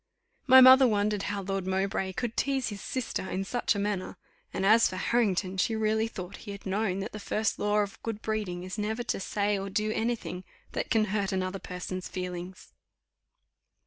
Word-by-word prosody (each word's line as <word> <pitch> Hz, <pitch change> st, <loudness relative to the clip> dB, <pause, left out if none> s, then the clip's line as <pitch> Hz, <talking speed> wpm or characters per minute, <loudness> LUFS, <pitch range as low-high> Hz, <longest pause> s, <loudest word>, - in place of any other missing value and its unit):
My 260 Hz, 0 st, +9 dB
mother 260 Hz, +1 st, +9 dB
wondered 210 Hz, -2 st, +1 dB
how 200 Hz, -1 st, -3 dB
Lord 195 Hz, -1 st, -3 dB
Mowbray 190 Hz, 0 st, -1 dB
could 235 Hz, +3 st, -3 dB
tease 270 Hz, -4 st, 0 dB
his 205 Hz, -2 st, -7 dB
sister 250 Hz, -6 st, -3 dB
in 190 Hz, -, -2 dB
such 240 Hz, +2 st, 0 dB
a -, -, -2 dB
manner; 200 Hz, -2 st, -2 dB, 0.3 s
and 190 Hz, -, -2 dB
as 220 Hz, +3 st, +6 dB
for -, -, -6 dB
Harrington, 190 Hz, -3 st, +1 dB
she 220 Hz, +4 st, +1 dB
really 220 Hz, 0 st, +1 dB
thought 190 Hz, -4 st, -7 dB
he 210 Hz, -, -11 dB
had 200 Hz, -, -11 dB
known 195 Hz, -1 st, -1 dB
that 205 Hz, +5 st, -5 dB
the 215 Hz, -, -7 dB
first 215 Hz, +2 st, -1 dB
law 210 Hz, 0 st, +1 dB
of 200 Hz, -1 st, -5 dB
good 225 Hz, -2 st, -4 dB
breeding 205 Hz, -5 st, -2 dB
is 185 Hz, +3 st, -6 dB
never 220 Hz, +3 st, -2 dB
to 235 Hz, -, -2 dB
say 205 Hz, +1 st, 0 dB
or 195 Hz, +1 st, -4 dB
do 215 Hz, +2 st, 0 dB
any 230 Hz, +2 st, 0 dB
thing 185 Hz, -5 st, -7 dB, 0.3 s
that -, -, -3 dB
can 220 Hz, -1 st, +3 dB
hurt 200 Hz, -2 st, 0 dB
another 185 Hz, 0 st, -2 dB
person's 180 Hz, 0 st, -5 dB
feelings. 180 Hz, +1 st, -6 dB
205 Hz, 195 wpm, -29 LUFS, 190-220 Hz, 0.3 s, My